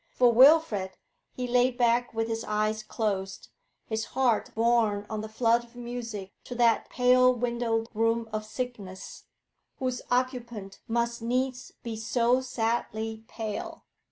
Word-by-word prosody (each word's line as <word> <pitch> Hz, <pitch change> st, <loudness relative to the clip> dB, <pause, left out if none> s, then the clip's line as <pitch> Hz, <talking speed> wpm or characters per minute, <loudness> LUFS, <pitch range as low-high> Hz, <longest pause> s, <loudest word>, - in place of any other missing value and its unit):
For 245 Hz, -5 st, +3 dB
Wilfrid, 245 Hz, -8 st, +5 dB, 0.3 s
he 250 Hz, -1 st, -4 dB
lay 245 Hz, +1 st, +4 dB
back 245 Hz, -1 st, +1 dB
with 225 Hz, 0 st, -1 dB
his 225 Hz, 0 st, -3 dB
eyes 215 Hz, +1 st, 0 dB
closed, 195 Hz, -3 st, -3 dB, 0.4 s
his 220 Hz, -1 st, -2 dB
heart 245 Hz, -5 st, +2 dB
borne 225 Hz, -3 st, +2 dB
on 215 Hz, -1 st, -2 dB
the 215 Hz, -, -7 dB
flood 230 Hz, +1 st, +2 dB
of 235 Hz, 0 st, -19 dB
music 235 Hz, -5 st, -6 dB
to 245 Hz, -, -6 dB
that 235 Hz, -2 st, +3 dB
pale 255 Hz, 0 st, +5 dB
windowed 235 Hz, -2 st, -1 dB
room 225 Hz, +1 st, +1 dB
of 215 Hz, 0 st, -2 dB
sickness, 215 Hz, -4 st, -7 dB, 0.5 s
whose 255 Hz, -2 st, -2 dB
occupant 240 Hz, -5 st, -2 dB
must 235 Hz, 0 st, -1 dB
needs 250 Hz, +2 st, -2 dB
be 230 Hz, -2 st, -4 dB
so 240 Hz, +3 st, +2 dB
sadly 225 Hz, -2 st, -2 dB
pale. 235 Hz, -, -5 dB
235 Hz, 135 wpm, -28 LUFS, 220-245 Hz, 0.5 s, Wilfrid